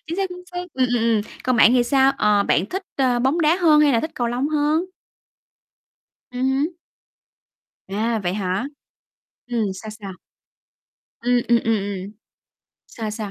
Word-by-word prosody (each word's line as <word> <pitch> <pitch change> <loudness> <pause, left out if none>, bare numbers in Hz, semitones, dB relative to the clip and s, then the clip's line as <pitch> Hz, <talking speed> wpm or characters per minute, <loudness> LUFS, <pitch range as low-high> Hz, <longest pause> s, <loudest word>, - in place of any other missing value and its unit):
Chính 335 +3 -4
xác, 390 -1 0
chính 360 0 -10
xác, 355 - -3
ừm, 260 -1 +2
ừm, 245 0 +1
ừm, 230 -2 +2 0.2
còn 255 -1 +1
bạn 230 - +6
thì 250 -1 +4
sao? 270 +1 +3
Ờ, 210 -1 +3
bạn 190 -1 +1
thích, 380 - -4
ơ, 255 -3 +2
bóng 265 +7 +1
đá 320 +2 +3
hơn 315 -5 +5
hay 290 -2 +4
là 230 - +3
thích 315 - -4
cầu 245 -4 -1
lông 250 +4 -1
hơn? 305 +2 +1 1.5
Ừ 250 - -7
hứ. 265 +3 +1 1.2
À, 220 +3 -1
vậy 180 0 -1
hả? 195 +4 -2 0.8
Ừm, 235 -3 -1
sao, 215 +3 -9
sao? 205 -3 -8 1.1
Ừm, 245 +1 +2
ừm, 235 0 +5
ừm, 225 0 +2
ừm. 200 -1 -5 0.7
Sao, 220 -2 -6
sao? 210 -2 -5
245 Hz, 170 wpm, -22 LUFS, 215-295 Hz, 1.5 s, bạn